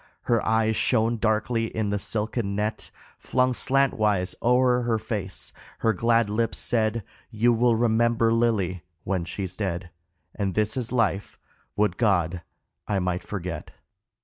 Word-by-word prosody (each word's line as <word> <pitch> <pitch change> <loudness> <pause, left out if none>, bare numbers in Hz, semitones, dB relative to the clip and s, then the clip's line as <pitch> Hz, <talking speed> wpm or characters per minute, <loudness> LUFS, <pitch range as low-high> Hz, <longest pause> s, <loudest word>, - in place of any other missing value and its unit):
Her 115 -2 +1
eyes 110 0 +2
shone 115 0 +2
darkly 115 +1 +1
in 110 -2 -2
the 105 - 0
silken 105 0 -2
net 105 +2 -2 0.3
Flung 130 0 +1
slantwise 110 -9 +1
o'er 125 +1 +3
her 120 -2 +1
face, 105 -4 -4 0.2
her 110 - +2
glad 115 +2 +2
lips 115 +3 -1
said, 110 -1 0 0.3
"You 120 +1 +2
will 120 0 +3
remember 115 0 +2
Lily 105 -7 +1 0.2
when 95 -3 -1
she's 95 +1 -5
dead." 90 -3 -3 0.4
And 100 -3 -2
this 110 0 +1
is 125 -3 -2
life 105 -5 0 0.4
would 105 -3 +1
God 90 -6 +1 0.5
I 100 - 0
might 90 -1 -1
forget 90 -4 -5
110 Hz, 140 wpm, -25 LUFS, 100-115 Hz, 0.5 s, o'er